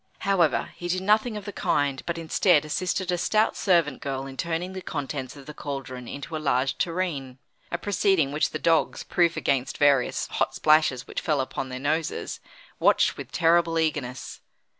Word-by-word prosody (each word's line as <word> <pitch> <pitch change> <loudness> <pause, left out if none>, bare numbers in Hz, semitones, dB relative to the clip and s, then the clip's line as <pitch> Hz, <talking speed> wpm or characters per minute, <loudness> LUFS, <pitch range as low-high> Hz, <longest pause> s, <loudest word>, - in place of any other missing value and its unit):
However, 185 -6 +2
he 175 - -5
did 185 +1 -1
nothing 215 +2 +2
of 205 - -8
the 205 - -5
kind, 140 -2 0
but 170 -1 -2
instead 165 -1 +3
assisted 185 +4 -1
a 175 - 0
stout 215 +4 +2
servant 170 -8 +2
girl 135 -1 -3
in 135 -1 -8
turning 170 +5 -3
the 190 - -6
contents 140 -4 -5
of 140 -2 -12
the 150 - -8
cauldron 135 -4 -6
into 140 +5 -6
a 155 - -3
large 130 -2 0
tureen; 165 -8 -2 0.3
a 170 - 0
proceeding 190 -5 +1
which 150 +1 +1
the - - -4
dogs, 165 0 +1
proof 170 -1 +1
against 135 -2 0
various 140 -3 +3
hot - - -1
splashes 155 -5 +3
which - - -5
fell 150 -4 0
upon 130 0 -3
their 130 - -5
noses, 155 +4 -2 0.4
watched - - +4
with - - -9
terrible 170 0 +3
eagerness. 145 -6 -2
155 Hz, 180 wpm, -26 LUFS, 135-175 Hz, 0.4 s, watched